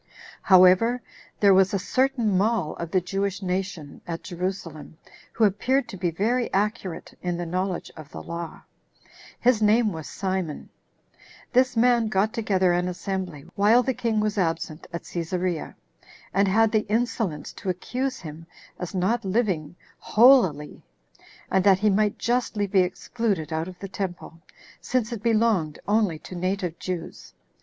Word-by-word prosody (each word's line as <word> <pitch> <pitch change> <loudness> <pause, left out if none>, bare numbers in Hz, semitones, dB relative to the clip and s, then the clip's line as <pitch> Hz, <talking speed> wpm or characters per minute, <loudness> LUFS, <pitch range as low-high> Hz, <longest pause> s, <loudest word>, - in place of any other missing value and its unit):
4. 190 - +8
However, 185 +7 +5 0.4
there 200 -2 +7
was 190 +2 +4
a - - +3
certain 240 +1 +1
mall 200 -3 +1
of 170 - -5
the 185 - +2
Jewish 195 +2 -2
nation 180 -5 -4
at 165 -1 -5
Jerusalem, 175 -4 -5 0.4
who 230 - 0
appeared 250 +7 +2
to - - -7
be 175 -1 0
very 230 +9 0
accurate 200 -3 -2
in 175 -1 -2
the 175 - -3
knowledge 185 +1 -3
of 155 -2 -11
the - - -8
law. 170 -1 -7 0.8
His 240 -2 +3
name 215 +1 +4
was 160 -2 -7
Simon. 185 -5 -3 0.8
This 255 -1 +3
man 235 -1 +4
got 215 +1 +1
together 190 -6 +2
an 175 +1 0
assembly, 180 -4 -4
while 220 +5 +4
the 260 - 0
king 230 -2 -1
was 210 -1 0
absent 165 -2 -2
at 170 - -5
Cæsarea, 175 0 -3 0.6
and 200 +1 +3
had 220 +3 +3
the 215 -1 +1
insolence 220 -8 -1
to 195 - -6
accuse 250 +9 -3
him 160 0 -9 0.3
as 180 +1 -5
not 215 +6 +1
living 185 -6 -1 0.2
holily, 215 - +4 0.7
and 190 -1 +3
that 195 -1 +6
he 210 +2 +2
might 210 +1 +1
justly 235 -3 0
be 195 -1 +2
excluded 180 -2 -1
out 160 +2 -2
of 185 -1 -9
the 195 - -7
temple, 180 -3 -6 0.4
since 245 -2 -1
it 230 -4 -5
belonged 220 -9 +1
only 205 -5 +2
to 155 - -11
native 180 -1 -2
Jews. 165 - -6
190 Hz, 155 wpm, -25 LUFS, 175-220 Hz, 0.8 s, 4